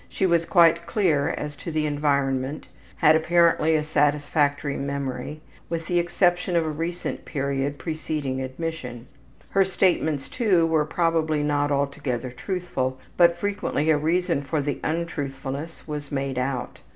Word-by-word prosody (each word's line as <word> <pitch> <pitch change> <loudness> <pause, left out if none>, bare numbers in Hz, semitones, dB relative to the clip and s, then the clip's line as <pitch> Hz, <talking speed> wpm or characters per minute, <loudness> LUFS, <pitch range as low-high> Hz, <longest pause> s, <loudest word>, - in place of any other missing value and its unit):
She 195 - 0
was 170 -2 +3
quite 170 -1 +4
clear 170 -7 +2
as 150 0 -4
to - - -7
the 155 -1 0
environment, 140 -1 0 0.3
had 155 -1 +5
apparently 165 -1 +3
a 155 - +1
satisfactory 145 -1 +1
memory, 140 +1 -4 0.3
with 165 -1 -3
the 175 -1 +1
exception 175 +1 +1
of 165 -1 +3
a - - -1
recent 165 +3 -4
period 140 -1 -2
preceding 155 -5 -3
admission. 130 -3 -5 0.5
Her 195 - +4
statements, 175 -6 +1
too, 195 -9 +2
were 160 -2 +2
probably 160 -2 +1
not 145 0 +1
altogether 140 -3 -1
truthful, 130 -4 -3 0.2
but 170 -1 +5
frequently 190 -6 0
a 155 - +4
reason 170 0 +1
for 150 +2 -2
the 145 0 -2
untruthfulness 145 -2 -4
was 150 -2 -5
made 135 -2 -2
out. 125 -1 -3
150 Hz, 140 wpm, -25 LUFS, 140-170 Hz, 0.5 s, had